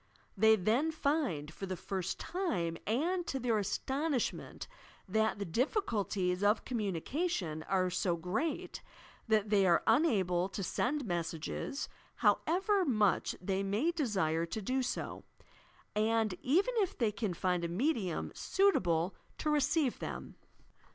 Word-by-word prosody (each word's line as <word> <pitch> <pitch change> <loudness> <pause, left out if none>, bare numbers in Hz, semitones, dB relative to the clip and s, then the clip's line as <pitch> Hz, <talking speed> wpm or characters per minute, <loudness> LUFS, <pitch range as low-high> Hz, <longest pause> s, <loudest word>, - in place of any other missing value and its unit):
They 220 +2 +6
then 225 - +1
find, 280 - -1
for 195 - -6
the 185 -1 -3
first 190 0 -3
time 185 - -1
and 335 - 0
to 270 - -1
their 235 -4 +1
aston 275 +9 -1
ishment, 250 - -2 0.4
that 220 +3 +1
the 200 - -3
difQculties 200 - 0
of 210 +2 +3
communication 205 - -2
are 185 -1 +2
so 175 -1 +1
great 215 - -2 0.5
that 215 -2 +2
they 200 -2 +5
are 170 -1 +4
unable 195 - +3
to 195 - -4
send 275 +9 -1
messages, 170 - -3 0.3
however 385 +4 +2
much 215 - +2
they 190 +1 -1
may 210 +12 +1
desire 190 - 0
to 195 - -4
do 255 +6 0
so, 250 - -3 0.7
and 220 -1 +2
even 380 - +2
if 395 -5 +1
they 225 -4 +2
can 205 -3 -2
find 180 -1 0
a - - 0
medium 195 - -1
suitable 185 - +2 0.2
to 305 - 0
receive 295 -2 +2
them. - - -6
215 Hz, 135 wpm, -33 LUFS, 185-285 Hz, 0.7 s, They